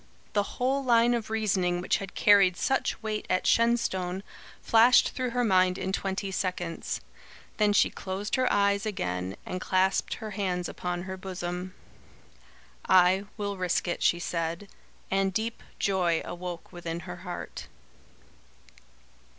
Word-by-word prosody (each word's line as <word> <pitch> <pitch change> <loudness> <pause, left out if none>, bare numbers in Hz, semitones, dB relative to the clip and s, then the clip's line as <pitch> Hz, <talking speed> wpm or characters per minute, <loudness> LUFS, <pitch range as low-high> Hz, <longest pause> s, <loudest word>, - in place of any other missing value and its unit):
The 205 -1 -1
whole 265 +2 +1
line 240 -1 +4
of 230 -2 -2
reasoning 195 -5 +1
which 180 - +1
had 195 -2 -8
carried 195 -3 +5
such 265 -4 0
weight 215 -1 -3
at 185 - +1
Shenstone 195 -6 +1 0.4
flashed 230 +2 +5
through 255 -1 -2
her 245 +1 0
mind 185 -4 +3
in 190 - -2
twenty 195 0 -2
seconds. 180 -3 -3 0.6
Then 210 -1 +3
she 205 - +4
closed 195 +2 -5
her 255 -1 +2
eyes 200 0 +2
again 90 - -3
and 185 - -4
clasped 190 +1 +1
her 220 -1 -7
hands 185 -3 -2
upon 175 0 -4
her 190 0 -6
bosom. 185 0 -5 1.1
"I 185 +1 +5
will 200 -2 -3
risk 180 0 0
it," 175 - -2
she 175 - +3
said; 170 +2 -3 0.4
and 195 0 +2
deep 225 +4 -3 0.2
joy 180 -4 +1
awoke 175 -1 -7
within 170 -1 -5
her 180 -1 -8
heart. 175 0 -7
190 Hz, 140 wpm, -28 LUFS, 180-210 Hz, 1.1 s, carried